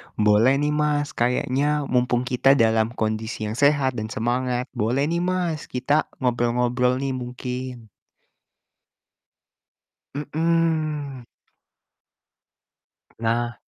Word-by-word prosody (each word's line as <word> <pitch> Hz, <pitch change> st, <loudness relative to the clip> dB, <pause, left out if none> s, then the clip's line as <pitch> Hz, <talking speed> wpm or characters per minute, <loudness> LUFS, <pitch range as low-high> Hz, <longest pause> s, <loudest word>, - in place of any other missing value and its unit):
boleh 105 Hz, +5 st, +4 dB
nih 145 Hz, +1 st, 0 dB
Mas, 150 Hz, -1 st, 0 dB
kayaknya 135 Hz, +5 st, 0 dB
mumpung 125 Hz, -1 st, +2 dB
kita 130 Hz, +2 st, +3 dB
dalam 110 Hz, -3 st, +3 dB
kondisi 110 Hz, 0 st, -2 dB
yang 115 Hz, -, -6 dB
sehat 140 Hz, -4 st, +2 dB
dan 110 Hz, -, -4 dB
semangat, 125 Hz, +3 st, -2 dB
boleh 120 Hz, +6 st, 0 dB
nih 170 Hz, -, 0 dB
Mas, 180 Hz, -3 st, -1 dB
kita 145 Hz, +4 st, 0 dB, 0.2 s
ngobrol-ngobrol 125 Hz, +1 st, +1 dB
nih 135 Hz, -, -1 dB
mungkin. 125 Hz, -2 st, -6 dB, 2.2 s
Mhm. 155 Hz, -2 st, -1 dB, 2.0 s
Nah, 120 Hz, +1 st, 0 dB
125 Hz, 90 wpm, -23 LUFS, 120-145 Hz, 2.2 s, boleh